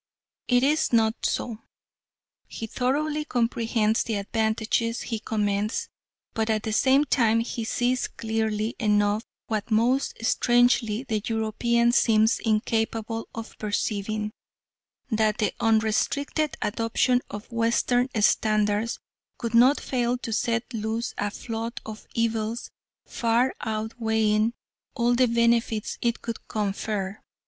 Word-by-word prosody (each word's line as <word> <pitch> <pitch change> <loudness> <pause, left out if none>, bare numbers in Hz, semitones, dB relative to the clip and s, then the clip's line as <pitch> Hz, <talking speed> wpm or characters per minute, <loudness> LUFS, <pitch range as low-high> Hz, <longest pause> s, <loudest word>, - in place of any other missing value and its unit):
It 245 0 +3
is 300 +3 +2
not 225 -1 +2
so. 225 -3 -3 0.9
He 225 - -6
thoroughly 295 +6 -1
comprehends 230 -4 +1
the 225 - -2
advantages 220 +2 0
he 225 -2 -3
commends, 210 0 -1 0.4
but 220 0 -1
at 215 -1 +1
the 220 - -2
same 270 +5 +4
time 230 -5 +3
he 230 0 -4
sees 245 +2 0
clearly 220 0 -2
enough, 210 -1 +2 0.2
what 215 -1 -3
most 235 +5 +2
strangely 240 -2 +3
the 220 -5 -2
European 235 +2 +1
seems 220 -1 +3
incapable 225 0 -1
of 225 0 -7
perceiving, 210 0 -2 0.8
that 220 -1 +2
the 210 - 0
unrestricted 225 +7 +1
adoption 230 +3 +1
of 205 +3 -8
Western 235 +2 +1
standards 215 +1 +2 0.4
could 230 -2 -4
not 250 +5 +6
fail 245 -1 -1
to 230 -2 -5
set 230 +1 0
loose 225 +2 -2
a 205 - 0
flood 225 +2 -5
of 215 0 -9
evils 230 0 -1 0.3
far 235 +2 +1
outweighing 220 0 0 0.4
all 240 -1 +2
the 250 +1 +4
benefits 235 -2 +1
it 235 -1 -1
could 230 -1 -6
confer. 205 -1 -3
225 Hz, 120 wpm, -26 LUFS, 215-240 Hz, 0.9 s, not